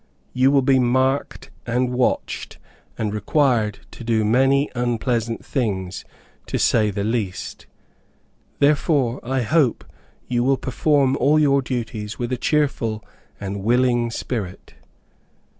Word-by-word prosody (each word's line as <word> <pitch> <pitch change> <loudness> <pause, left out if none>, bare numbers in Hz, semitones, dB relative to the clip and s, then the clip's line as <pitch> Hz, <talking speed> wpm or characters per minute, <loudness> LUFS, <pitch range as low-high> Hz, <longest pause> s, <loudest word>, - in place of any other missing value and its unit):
You 130 +1 +4
will 140 -1 +3
be 130 0 +4
marked 130 +3 0 0.2
and 125 +2 0
watched, 125 0 -1 0.4
and 105 -1 -2
required 110 -1 +1
to - - -10
do 115 -2 +1
many 135 +5 +3
unpleasant 120 -1 -1
things, 95 -7 -3 0.4
to - - -2
say 110 -2 +3
the 100 0 -3
least. 105 -4 -3 0.9
Therefore 140 -3 +2
I 130 +1 -1
hope 140 -1 +2 0.4
you 120 -1 0
will 135 +1 +2
perform 135 +1 +1
all 145 +5 +3
your 140 -2 +3
duties 115 -4 -4
with 120 0 -3
a 125 - 0
cheerful 120 -6 0 0.3
and 100 0 -5
willing 120 +1 +2
spirit." 110 -5 -5
125 Hz, 125 wpm, -22 LUFS, 110-135 Hz, 0.9 s, You